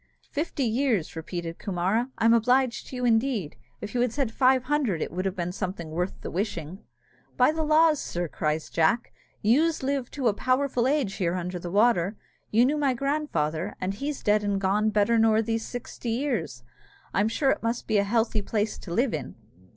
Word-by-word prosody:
"Fifty 295 Hz, -1 st, -2 dB
years!" 230 Hz, -, 0 dB
repeated 165 Hz, +1 st, -5 dB
Coomara; 200 Hz, +6 st, 0 dB
"I'm 230 Hz, +1 st, +4 dB
obliged 245 Hz, +2 st, +2 dB
to -, -, -8 dB
you, 250 Hz, 0 st, -2 dB
indeed! 225 Hz, -, +1 dB, 0.3 s
If 210 Hz, -, -6 dB
you 245 Hz, -, +1 dB
had 245 Hz, -2 st, +1 dB
said 265 Hz, -3 st, -1 dB
five 255 Hz, +1 st, +3 dB
hundred, 255 Hz, -, 0 dB
it -, -, -3 dB
would 185 Hz, +2 st, -3 dB
have 190 Hz, -1 st, -1 dB
been 175 Hz, -2 st, -2 dB
something 180 Hz, -4 st, -5 dB
worth 180 Hz, +3 st, -2 dB
the -, -, -6 dB
wishing." 180 Hz, -2 st, -3 dB, 0.6 s
"By 250 Hz, +4 st, +5 dB
the 320 Hz, +1 st, -3 dB
laws, 310 Hz, 0 st, +4 dB
sir," 175 Hz, 0 st, -3 dB
cries 155 Hz, +1 st, -2 dB
Jack, 165 Hz, +9 st, +1 dB, 0.3 s
"youz 300 Hz, +8 st, +3 dB
live 270 Hz, -2 st, -1 dB
to 270 Hz, -4 st, -2 dB
a 215 Hz, -, +3 dB
powerful 255 Hz, +2 st, +1 dB
age 270 Hz, -8 st, +1 dB
here 175 Hz, -2 st, 0 dB
under 180 Hz, 0 st, -3 dB
the 175 Hz, -, -6 dB
water! 205 Hz, -1 st, +2 dB, 0.3 s
You 230 Hz, +3 st, +4 dB
knew 295 Hz, +4 st, +1 dB
my 275 Hz, -3 st, +1 dB
grandfather, 210 Hz, -, -1 dB
and 185 Hz, +1 st, -2 dB
he's 280 Hz, +7 st, -4 dB
dead 210 Hz, 0 st, +3 dB
and 200 Hz, -1 st, 0 dB
gone 205 Hz, +3 st, +2 dB
better 215 Hz, +2 st, +2 dB
than 220 Hz, 0 st, +4 dB
these 225 Hz, 0 st, -2 dB
sixty 245 Hz, 0 st, -6 dB
years. 225 Hz, -, -2 dB, 0.5 s
I'm 205 Hz, +2 st, +2 dB
sure 270 Hz, +4 st, +2 dB
it -, -, -1 dB
must 230 Hz, +1 st, -2 dB
be 215 Hz, -2 st, +2 dB
a -, -, +3 dB
healthy 225 Hz, +1 st, +1 dB
place 210 Hz, +1 st, -2 dB
to 175 Hz, -, -9 dB
live 240 Hz, +7 st, +1 dB
in." -, -, -5 dB
225 Hz, 195 wpm, -26 LUFS, 185-255 Hz, 0.6 s, By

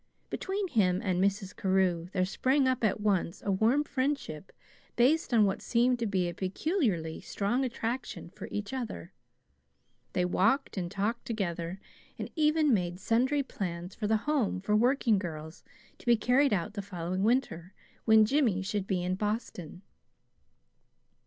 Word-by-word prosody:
Between 390 Hz, +1 st, -2 dB
him 185 Hz, -, +2 dB
and 185 Hz, -3 st, +1 dB
Mrs. 195 Hz, -1 st, -1 dB
Carew 185 Hz, -3 st, +1 dB
there 185 Hz, -2 st, +1 dB
sprang 260 Hz, +8 st, +1 dB
up 255 Hz, -2 st, 0 dB
at 215 Hz, -1 st, +2 dB
once 195 Hz, -4 st, 0 dB
a 200 Hz, -, +1 dB
warm 225 Hz, +9 st, +3 dB
friendship 260 Hz, -, -3 dB, 0.4 s
based 270 Hz, +7 st, +3 dB
on 225 Hz, -3 st, +5 dB
what 195 Hz, -, -1 dB
seemed 245 Hz, +1 st, +2 dB
to 230 Hz, -, -1 dB
be 190 Hz, -3 st, 0 dB
a 175 Hz, -, -4 dB
peculiarly 190 Hz, -, -1 dB
strong 235 Hz, +6 st, -1 dB
attraction 235 Hz, -6 st, -4 dB
for -, -, -8 dB
each 205 Hz, +4 st, -4 dB
other. 225 Hz, -, -5 dB, 1.0 s
They 180 Hz, -, +1 dB
walked 225 Hz, +10 st, +1 dB
and 180 Hz, -3 st, -3 dB
talked 210 Hz, +5 st, -2 dB
together, 180 Hz, -5 st, -3 dB, 0.4 s
and -, -, -6 dB
even 305 Hz, -2 st, +3 dB
made 175 Hz, -3 st, -1 dB
sundry 255 Hz, +8 st, +1 dB
plans 180 Hz, -6 st, -5 dB
for 210 Hz, -, -3 dB
the 220 Hz, +1 st, +3 dB
Home 245 Hz, -5 st, 0 dB
for 210 Hz, +3 st, 0 dB
Working 240 Hz, -2 st, +3 dB
Girls, 160 Hz, -3 st, -7 dB, 0.4 s
to -, -, -18 dB
be 235 Hz, -1 st, +5 dB
carried 250 Hz, +5 st, +3 dB
out 205 Hz, +1 st, -1 dB
the 205 Hz, -, -4 dB
following 185 Hz, -1 st, -4 dB
winter 195 Hz, -6 st, 0 dB, 0.3 s
when 220 Hz, -1 st, +6 dB
Jimmy 225 Hz, -7 st, +2 dB
should 200 Hz, 0 st, -2 dB
be 180 Hz, -2 st, 0 dB
in 180 Hz, +1 st, -1 dB
Boston. 205 Hz, -4 st, -4 dB
205 Hz, 155 wpm, -30 LUFS, 185-245 Hz, 1.0 s, when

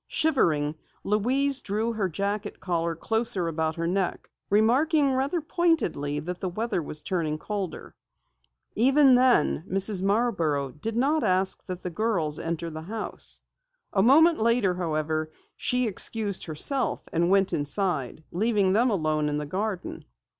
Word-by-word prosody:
Shivering, 160 Hz, -, +1 dB, 0.3 s
Louise 260 Hz, +7 st, +1 dB
drew 220 Hz, +3 st, -2 dB
her 205 Hz, -4 st, -1 dB
jacket 200 Hz, +4 st, -3 dB
collar 170 Hz, -2 st, -1 dB
closer 220 Hz, 0 st, +1 dB
about 160 Hz, -1 st, -1 dB
her 165 Hz, -, -3 dB
neck, 185 Hz, +1 st, -2 dB, 0.2 s
remarking 270 Hz, +7 st, +3 dB
rather 275 Hz, +6 st, 0 dB
pointedly 305 Hz, -, 0 dB
that 180 Hz, +3 st, -6 dB
the 185 Hz, -, -3 dB
weather 215 Hz, +1 st, -2 dB
was 150 Hz, 0 st, -3 dB
turning 160 Hz, -3 st, -1 dB
colder. 200 Hz, +1 st, -5 dB, 0.8 s
Even 270 Hz, +3 st, +5 dB
then, 250 Hz, -, +3 dB
Mrs. 195 Hz, 0 st, +2 dB
Marborough 190 Hz, -, 0 dB
did 220 Hz, -, -5 dB
not 295 Hz, +5 st, +2 dB
suggest 190 Hz, -1 st, +1 dB
that 185 Hz, -1 st, -6 dB
the 180 Hz, -, -4 dB
girls 170 Hz, -6 st, -1 dB
enter 165 Hz, 0 st, -4 dB
the 155 Hz, 0 st, -7 dB
house. 215 Hz, +6 st, -3 dB, 0.5 s
A 195 Hz, -, +3 dB
moment 315 Hz, -, +5 dB
later, 230 Hz, -4 st, +2 dB
however, 155 Hz, -2 st, -2 dB, 0.3 s
she 250 Hz, 0 st, +1 dB
excused 205 Hz, -1 st, 0 dB
herself 215 Hz, -, -1 dB
and 170 Hz, +1 st, +1 dB
went 195 Hz, 0 st, +3 dB
inside, 155 Hz, -2 st, -1 dB
leaving 200 Hz, 0 st, +1 dB
them 240 Hz, +5 st, +3 dB
alone 155 Hz, -6 st, 0 dB
in 145 Hz, -, -2 dB
the 150 Hz, -, -3 dB
garden. 190 Hz, +4 st, -4 dB
195 Hz, 140 wpm, -26 LUFS, 165-235 Hz, 0.8 s, Even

